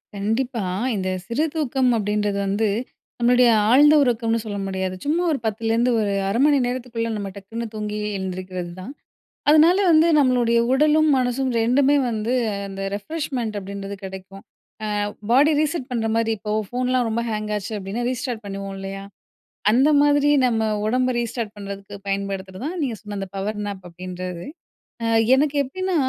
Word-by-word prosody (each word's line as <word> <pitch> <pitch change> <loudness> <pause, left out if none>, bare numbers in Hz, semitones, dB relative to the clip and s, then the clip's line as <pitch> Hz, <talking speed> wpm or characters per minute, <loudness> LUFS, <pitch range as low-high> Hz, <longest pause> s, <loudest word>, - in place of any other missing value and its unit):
கண்டிப்பா. 225 +3 -1 0.3
இந்த 185 -1 -2 0.2
சிறு 275 +7 0
தூக்கம் 265 -4 +1
அப்படின்றது 210 -1 -1
வந்து 210 +3 +1 0.5
நம்மளுடைய 245 0 +5 0.2
ஆழ்ந்த 290 +5 +7
உறக்கம்னு 230 -2 +1
சொல்ல 210 -2 -5
முடியாது. 190 -1 -2
ச்சும்மா 320 +5 +1
ஒரு 280 - 0
10 220 +1 -2
லேருந்து 235 +2 +2
ஒரு 205 -1 0 0.2
அரை 205 +4 0
மணி 295 -1 +4
நேரத்துக்குள்ள 245 -2 -3
நம்ம 200 -2 -4
டக்குனு 225 +4 -6
தூங்கி 210 -1 -4 0.2
எழுந்திரிக்கிறது 185 -1 -5
தான். 205 +9 -7 0.6
அதனால 320 +5 +6
வந்து 320 0 +6
நம்மளுடைய 245 -4 +3
உடலும் 305 +2 +4
மனசும் 255 +1 0
2மே 270 +5 +3
வந்து 225 +1 -2 0.4
அந்த 195 0 -7
ரெஃப்ரெஷ்மெண்ட் 235 -1 -3
அப்டின்றது 200 0 -6
கெடைக்கும். 190 +1 -9 0.6
அ - - -1 0.2
பாடி 290 +5 +5
ரீசெட் 310 -3 -1
பண்றமாரி 225 -1 0
இப்போ 210 0 -4 0.2
ஃபோன்லாம் 250 +1 0
ரொம்ப 230 +1 -1
ஹேங் 215 0 -3
ஆச்சு 205 +2 -5
அப்டின்னா, 200 +5 -4
ரீஸ்டார்ட் 250 -2 -4
பண்ணுவோம் 195 0 -5
இல்லயா! 195 0 -6 0.7
அந்த 260 +6 +4
மாதிரி 290 0 +4 0.2
நம்ம 225 -2 +1 0.2
உடம்ப 255 +3 +1
ரீஸ்டார்ட் 230 -2 -3
பண்றதுக்கு 200 0 -8
பயன்படுத்துறதான் 195 - -3
நீங்க 255 -5 -1
சொன்ன 210 -1 -7
அந்த 195 -1 -4
பவர் 205 +2 -3
நேப் 200 -2 -6
அப்டின்றது. 180 0 -7 0.6
அ - - 0 0.3
எனக்கு 290 +2 +1
எப்டின்னா, 370 +7 -3
225 Hz, 145 wpm, -22 LUFS, 200-255 Hz, 0.7 s, ஆழ்ந்த